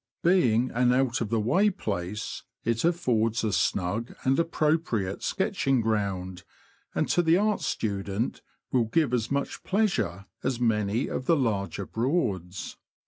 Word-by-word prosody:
Being 130 -9 +3
an 125 +1 +3
out 130 -2 +1
of 110 - -1
the 115 0 +1
way 180 - +3
place, 105 - -4 0.2
it 115 0 0
affords 120 -10 +1
a 110 -2 0
snug 100 +6 0
and 135 +4 +2
appropriate 155 - 0
sketching 135 -2 +1
ground, 100 -5 -1 0.5
and - - +1
to 175 - +3
the 165 0 +4
art 210 +1 +1
student 100 +1 -2 0.3
will 125 -3 +3
give 130 +3 +1
as 120 -2 0
much 140 0 -2
pleasure 185 - 0 0.2
as 130 -2 -1
many 110 0 +1
of 130 - -4
the 165 - +4
larger 100 -6 -1
Broads. 105 - -2
115 Hz, 140 wpm, -27 LUFS, 105-140 Hz, 0.5 s, the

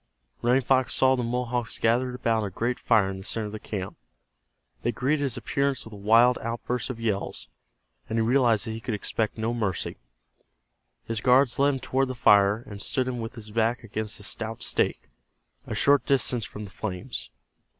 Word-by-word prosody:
Running 125 +3 +3
Fox 130 -1 +2
saw 130 0 +5
the 125 - -1
Mohawks 120 -1 -2
gathered 125 +2 +1
about 115 -3 +1
a 100 - -2
great 120 +6 -2
fire 105 -5 +3
in 95 - -6
the - - -9
center 110 +2 -2
of 105 - -6
the 110 - -6
camp. 100 -3 -5 0.8
They 120 - 0
greeted 140 +5 0
his 135 -4 0
appearance 140 -1 -1
with 110 - -11
a - - -8
wild 115 +5 +5
outburst 115 +1 -3
of 125 -3 -5
yells, 105 -4 -2 0.6
and 110 - -1
he 115 - +3
realized 120 -3 +3
that 110 - -4
he 110 +1 -6
could 115 -1 -2
expect 110 +2 -2
no 110 +1 -1
mercy. 105 -5 -2 1.1
His 115 -1 -3
guards 125 0 +4
led 140 0 +4
him - - -4
toward 135 +1 +1
the 130 - -4
fire, 100 0 +4
and 100 -1 -8
stood 130 -1 -1
him 125 -1 -3
with 115 0 -5
his 110 -3 -10
back 115 +2 +1
against 110 -1 -5
a - - -12
stout 110 +2 -4
stake, - - 0 0.6
a - - -3
short 140 0 +4
distance 125 -4 +1
from 105 0 -8
the 100 - -11
flames. 90 - -5
115 Hz, 195 wpm, -26 LUFS, 105-125 Hz, 1.1 s, saw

